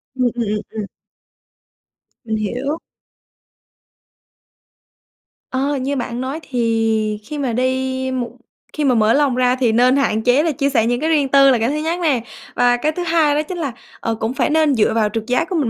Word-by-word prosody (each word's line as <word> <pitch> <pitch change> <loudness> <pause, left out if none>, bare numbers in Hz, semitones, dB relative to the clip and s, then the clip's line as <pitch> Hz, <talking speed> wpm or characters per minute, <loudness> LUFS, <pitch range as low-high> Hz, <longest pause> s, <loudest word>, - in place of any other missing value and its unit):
Ừm, 255 -1 0
ừm, 235 - -1
ừm, 210 0 -2
ừm. 215 -2 -5 1.4
Mình 220 -1 -2
hiểu. 250 +8 -2 2.7
Ờ, 275 +2 0
như 270 +2 -2
bạn 245 -1 -3
nói 270 +4 -4
thì 225 -3 0
khi 295 +7 -7
mà 265 -4 -1
đi 260 +1 -1
một 245 -2 -2 0.4
khi 305 - -2
mà 255 -3 +3
mở 220 0 +3
lòng 280 -3 +2
ra 250 0 +2
thì 250 -4 +1
nên 250 +3 +4
hạn 220 -6 +1
chế 255 +5 +3
là 330 - +1
chia 280 0 0
sẻ 225 -5 +2
những 245 +1 0
cái 315 - 0
riêng 290 -4 +2
tư 275 -1 +6
là 250 - +4
cái 230 +3 +1
thứ 295 - -1
nhất 320 +3 -2
nè, 275 -9 +1 0.3
và 245 0 +3
cái 300 +5 0
thứ 355 +3 -4
hai 320 -3 +2
đó 300 - +2
chính 365 - -5
là, 285 -7 -3 0.3
ờ, 225 - -2
cũng 225 +3 -3
phải 265 -3 0
nên 310 -2 +3
dựa 220 -2 +2
vào 215 -2 +2
trực 225 -1 -3
giác 255 +9 0
của 365 - -2
mình 280 -8 +1
255 Hz, 205 wpm, -19 LUFS, 230-290 Hz, 2.7 s, tư